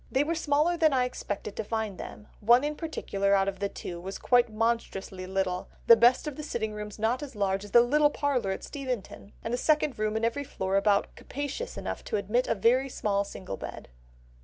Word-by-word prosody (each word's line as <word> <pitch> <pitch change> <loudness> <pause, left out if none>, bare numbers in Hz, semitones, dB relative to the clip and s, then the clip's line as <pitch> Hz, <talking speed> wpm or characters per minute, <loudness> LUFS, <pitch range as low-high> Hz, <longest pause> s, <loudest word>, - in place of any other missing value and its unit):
They 265 +2 +3
were 320 +3 -1
smaller 315 +1 +1
than 315 -3 +4
I 255 -1 +3
expected 210 -4 -5
to - - -2
find 215 -2 -3
them; 210 - -9
one 240 +5 +5
in 300 +1 -1
particular 200 - 0
out 195 0 +2
of 195 - -3
the 200 0 -1
two 175 -3 -7
was 190 +2 -6
quite 245 -2 +3
monstrously 215 -4 -2
little; 185 -1 -2 0.2
the 230 - +9
best 240 +3 +4
of 300 -3 -5
the - - -4
sitting 225 -7 -3
rooms 210 -1 -7
not 225 +5 0
as 280 -4 -7
large 195 -1 0
as 205 - -9
the 235 +4 +7
little 295 +5 +4
parlour 275 -8 0
at 190 - -3
Steventon, 250 -7 -6
and 225 - -3
the 245 - 0
second 300 -5 +1
room 215 0 0
in 225 - 0
every 260 +5 -1
floor 190 -8 -3
about 200 0 +2
capacious 285 - -5
enough - - -4
to - - -1
admit 215 +5 0
a - - +1
very 250 +6 +3
small 200 -5 0
single 185 - -7
bed." - - -8
230 Hz, 215 wpm, -28 LUFS, 200-270 Hz, 0.2 s, the